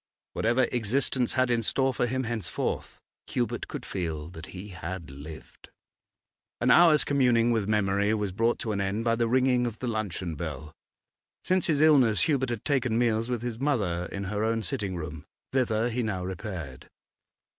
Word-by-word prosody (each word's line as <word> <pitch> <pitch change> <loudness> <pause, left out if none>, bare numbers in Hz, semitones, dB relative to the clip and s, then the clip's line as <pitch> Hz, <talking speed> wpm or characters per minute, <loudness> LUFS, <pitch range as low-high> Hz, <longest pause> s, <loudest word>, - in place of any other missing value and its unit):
Whatever 120 +3 +2
existence 125 +2 +1
had 130 -1 +2
in 120 -1 +2
store 130 +4 +1
for 120 - 0
him 130 +2 -1
henceforth, 115 -6 -3 0.3
Hubert - - -2
could - - -6
feel 80 -4 -4
that 80 -2 -10
he 95 +3 -9
had 85 -2 -6
lived. 75 +3 -11 0.9
An - - +3
hour's 165 -4 +7
communing 120 -4 +3
with 110 -4 0
memory 100 -1 +2
was 105 -3 -2
brought 115 +5 +1
to 110 - -2
an 100 -1 -1
end 100 +3 -1
by 115 0 +2
the 115 0 +1
ringing 125 0 +3
of 110 -2 -5
the - - -5
luncheon 100 -7 -2
bell. 75 -2 -6 0.7
Since 185 0 +1
his 150 -3 +2
illness 130 - +5
Hubert 130 +2 +1
had 120 -3 -4
taken 130 -5 +1
meals 115 -1 +1
with 120 -2 -2
his 120 -2 -4
mother 100 -12 0
in 100 - -4
her 105 +2 -2
own 115 0 0
sitting 95 0 -2
room. 75 -2 -6 0.3
Thither 120 -3 +1
he 125 +2 -1
now 95 -5 -2
repaired. 90 - -6
110 Hz, 175 wpm, -28 LUFS, 95-125 Hz, 0.9 s, hour's